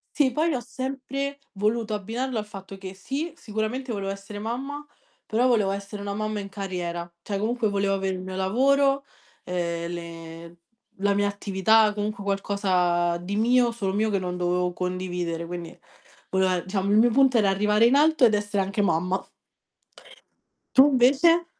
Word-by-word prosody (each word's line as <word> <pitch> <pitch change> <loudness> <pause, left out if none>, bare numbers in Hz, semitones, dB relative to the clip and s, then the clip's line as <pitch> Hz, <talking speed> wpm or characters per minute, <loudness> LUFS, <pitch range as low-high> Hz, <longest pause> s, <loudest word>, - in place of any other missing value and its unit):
Sì, 270 -5 +3
poi 320 +4 +1
ho 250 - -1
sempre 275 +2 -4
voluto 215 +2 0
abbinarlo 230 +4 -3
al 210 - -2
fatto 195 -1 -10
che, 190 -1 -8
sì, 275 - -4
sicuramente 225 +3 -3
volevo 195 -2 -3
essere 200 +1 -7
mamma, 270 +7 -4 0.4
però 235 +4 +1
volevo 215 -6 +3
essere 200 +1 -5
una 200 0 -3
mamma 215 0 -2
in 200 - -6
carriera, 180 -3 -4
cioè 200 +1 -3
comunque 225 +1 0
volevo 200 -1 +1
avè 195 0 -1
il 190 -1 -2
mio 185 0 -6
lavoro, 275 +8 +2 0.4
ehm, 170 -1 -2
le 170 0 -9 0.4
la 200 0 +2
mia 205 0 +2
attività, 205 +2 +3
comunque 210 -1 -3
qualcosa 185 -4 +1
di 185 +4 -4
mio, 240 +2 +4
solo 200 -5 -2
mio 215 +2 +1
che 200 - +1
non 180 -1 -3
dovevo 180 0 0
condividere, 180 -2 -3
quindi 170 -1 -7 0.5
volae 185 -2 +1
diciamo 195 0 -1
il 205 - +4
mio 240 +2 +5
punto 265 -2 +4
era 200 -2 +3
arrivare 210 +3 +3
in 245 - +4
alto 305 -1 +4
ed 220 -3 +5
essere 205 -1 0
anche 195 +2 -1
mamma. 180 +1 0 1.5
Tu 265 - +10
invece? 285 +7 +5
200 Hz, 165 wpm, -25 LUFS, 185-235 Hz, 1.5 s, Tu